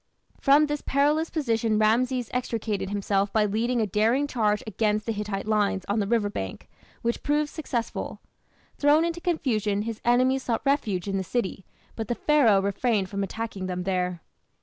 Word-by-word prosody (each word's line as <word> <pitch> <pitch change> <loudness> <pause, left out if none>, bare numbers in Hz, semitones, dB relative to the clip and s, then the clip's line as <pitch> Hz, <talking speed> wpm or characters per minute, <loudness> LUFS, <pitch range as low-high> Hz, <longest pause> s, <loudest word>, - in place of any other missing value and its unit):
From 290 +2 +5
this 295 -1 -3
perilous 295 +4 +1
position 230 -8 0
Rameses 240 +3 +1
extricated 225 -5 -2
himself 200 0 0
by 215 -1 +3
leading 230 +4 0
a - - +2
daring 220 +8 +2
charge 215 -6 0
against 215 0 0
the 230 - -1
Hittite 210 -2 -3
lines 205 -3 +1
on 205 +2 0
the 200 - 0
river 225 -2 +2
bank, 95 - -6 0.4
which 235 0 -1
proved 295 0 0
successful. 250 -7 -4 0.6
Thrown 295 +3 +4
into 340 0 -3
confusion, 215 - 0
his 225 -1 -5
enemies 255 +2 +3
sought 235 -3 -2
refuge 220 -10 0
in 195 -1 -1
the 190 - -1
city, 195 -3 -3 0.3
but 225 -2 -4
the 240 - -1
Pharaoh 230 -11 +4
refrained 200 0 0
from 200 -1 -3
attacking 200 -2 -4
them 180 -1 -3
there. 180 -2 -1
225 Hz, 170 wpm, -26 LUFS, 200-255 Hz, 0.6 s, From